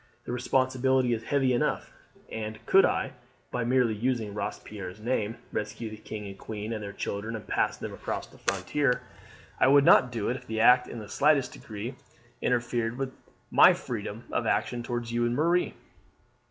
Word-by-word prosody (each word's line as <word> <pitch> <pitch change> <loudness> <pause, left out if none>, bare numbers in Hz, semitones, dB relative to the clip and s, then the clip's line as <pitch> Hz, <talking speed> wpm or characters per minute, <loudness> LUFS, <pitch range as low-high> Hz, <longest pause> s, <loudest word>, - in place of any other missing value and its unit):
The - - -6
responsibility 130 0 +2
is 110 - -2
heavy 135 -3 +2
enough; 120 - -1 0.4
and 110 -1 -4
could 195 - +6
I, - - 0 0.4
by 125 - -1
merely 125 -1 +3
using 110 -1 -1
Robespierre's 100 -2 -6
name, 115 -1 -1
rescue 110 +1 -4
the 110 - -8
king 105 0 -7
and 100 -1 -7
queen 110 +1 -5
and 110 - -4
their 100 -1 -5
children 105 +3 -4
and 110 - -7
pass - - +1
them - - -6
across - - -4
the - - -18
frontier, 140 -4 0 0.6
I - - +5
would 140 +1 +6
not 125 - +6
do 115 -4 -2
it 125 - -1
if 125 -1 -14
the 110 0 -2
act 125 +2 +6
in - - -7
the 105 -2 -7
slightest 140 +3 +2
degree 110 +4 -6 0.5
interfered 120 -1 0
with 135 -1 -3 0.4
my - - +8
freedom - - -5
of - - 0
action 120 - 0
towards 120 -1 -3
you 120 0 +1
and 120 0 +1
Marie." 170 +5 +2
120 Hz, 180 wpm, -28 LUFS, 110-130 Hz, 0.6 s, my